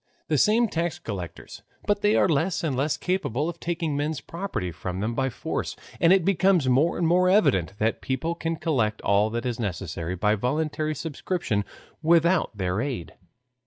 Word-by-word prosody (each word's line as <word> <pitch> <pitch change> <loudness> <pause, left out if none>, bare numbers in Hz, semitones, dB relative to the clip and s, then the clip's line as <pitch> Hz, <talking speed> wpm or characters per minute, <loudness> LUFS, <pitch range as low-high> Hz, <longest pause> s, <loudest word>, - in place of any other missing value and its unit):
The 155 - +2
same 225 - +4
tax 170 -4 -2
collectors, 90 -6 -7 0.2
but 205 0 +1
they 210 +1 +3
are - - +4
less 165 +3 +1
and 150 -5 0
less 140 +4 0
capable 165 - -1
of 170 0 -5
taking 165 -3 -2
men's 145 +1 -1
property 165 - -4
from 90 +4 -5
them 110 +4 -1
by 135 +2 0
force, - - -4 0.2
and 165 - +5
it 190 -3 +4
becomes 190 -6 +3
more 135 +7 +3
and 175 - +1
more 180 +2 +4
evident 100 - +3
that 110 +2 0
people 135 +6 -1
can 165 -1 -2
collect 120 -11 0
all 100 +2 +3
that 120 +2 -3
is 120 -2 -2
necessary 90 -4 -3
by 105 +3 +2
voluntary 155 +7 -1
subscription 150 - -2 0.4
without 170 - +3
their 95 +2 -1
aid. 130 - -4
145 Hz, 175 wpm, -25 LUFS, 110-170 Hz, 0.4 s, and